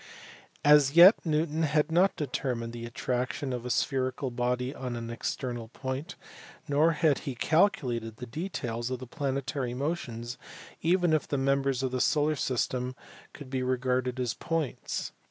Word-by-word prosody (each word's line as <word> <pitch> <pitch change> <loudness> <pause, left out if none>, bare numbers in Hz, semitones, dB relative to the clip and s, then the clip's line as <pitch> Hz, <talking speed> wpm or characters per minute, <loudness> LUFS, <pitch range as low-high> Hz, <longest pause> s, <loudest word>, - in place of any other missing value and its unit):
As 145 -2 +6
yet 175 +6 +8
Newton 155 0 0
had 150 0 +2
not 180 +4 +4
determined 125 -5 -3
the 120 0 -6
attraction 125 +3 -2
of 125 0 -4
a - - -4
spherical 130 0 0
body 125 +2 -1
on 125 -4 -5
an 115 0 -5
ex 115 - -2
ternal 120 -3 -5
point, 130 +6 -5 0.5
nor 155 +3 +3
had 155 -3 +2
he 135 -4 -5
calculated 125 - +1
the 125 - -6
details 120 -5 -4
of 130 - -2
the 130 - -8
planetary 135 -1 -3
motions 125 -4 -4 0.4
even 175 0 +3
if 155 - +1
the 140 - -1
members 135 -1 +1
of 130 - 0
the 130 -1 -1
solar 150 +3 +2
system 125 -1 -1 0.4
could 135 -3 -11
be 130 -1 -1
re 130 0 +1
garded 125 0 -1
as 125 -2 0
points. 165 -5 -3
130 Hz, 160 wpm, -29 LUFS, 125-150 Hz, 0.5 s, yet